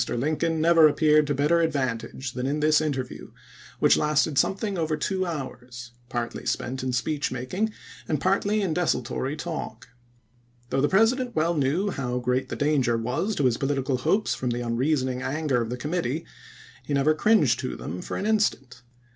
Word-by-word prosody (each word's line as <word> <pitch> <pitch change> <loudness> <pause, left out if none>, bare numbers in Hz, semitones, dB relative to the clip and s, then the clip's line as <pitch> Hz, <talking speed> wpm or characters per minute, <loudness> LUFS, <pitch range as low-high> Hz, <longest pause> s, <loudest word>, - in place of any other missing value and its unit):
Lincoln 155 +6 0
never 165 -1 +6
ap - - -4
peared 150 -1 +4
to 145 - 0
better 150 +5 +3
advantage 130 -4 -2
than 125 +1 -3
in 145 +2 -1
this 155 +1 +4
interview, 135 -5 -4 0.5
which - - +4
lasted 150 0 +1
something 195 +8 +1
over 160 -3 -1
two 185 +4 -1
hours, 125 -6 -7 0.2
partly 120 -2 -4
spent 130 +2 -2
in 130 0 -2
speech 140 +5 -1
making 180 - -2 0.4
and 150 - 0
partly 200 +5 +1
in 180 -5 0
desultory 135 -4 -1
talk. 150 -8 -6 0.8
Though 135 - +1
the 145 - +2
President 235 +4 +2
well 165 +2 +2
knew 160 +7 0
how 125 -5 -3
great 125 +1 -1
the - - -3
danger 140 -5 +1
was 140 - -1
to 145 - 0
his 120 -2 +2
political 135 -1 -1
hopes 200 +11 +1
from 125 - -3
the 120 0 -2
un 115 -1 -2
reasoning 130 -1 0
anger 140 -3 0
of 115 - -3
the 125 - -3
committee, 155 +1 -2 0.6
he 145 - -3
never 140 +3 +3
cringed 200 - +3
to - - -4
them 90 +4 -6
for - - -5
an 195 - -3
instant. 170 - 0
145 Hz, 180 wpm, -25 LUFS, 125-165 Hz, 0.8 s, never